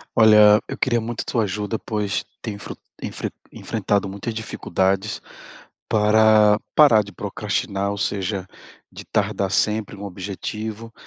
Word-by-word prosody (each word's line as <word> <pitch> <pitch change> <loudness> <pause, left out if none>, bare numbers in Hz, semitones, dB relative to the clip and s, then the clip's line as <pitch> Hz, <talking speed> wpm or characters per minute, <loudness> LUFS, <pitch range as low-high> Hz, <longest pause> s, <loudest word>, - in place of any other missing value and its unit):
Olha, 105 -2 +7
eu - - -6
queria 120 -3 +1
muito 115 +1 -4
a - - -8
tua 115 -2 +2
ajuda, 105 +2 -3
pois 105 -2 -2 0.2
tenho, 105 -4 -5 0.4
en - - -3
enfren - - -5 0.2
enfrentado 100 -1 -1
muitas 100 +4 -5
dificuldades 100 -1 -1 0.7
para 105 0 +5 0.2
parar 120 -8 +6
de 100 - -12
procrastinar. 100 +3 -2
Ou 100 - -4
seja, 100 -1 -2 0.4
de - - -10
tardar 100 -2 -1
sempre 105 0 0
um 100 - -10
objetivo, 105 +4 -6
105 Hz, 135 wpm, -22 LUFS, 100-110 Hz, 0.7 s, Olha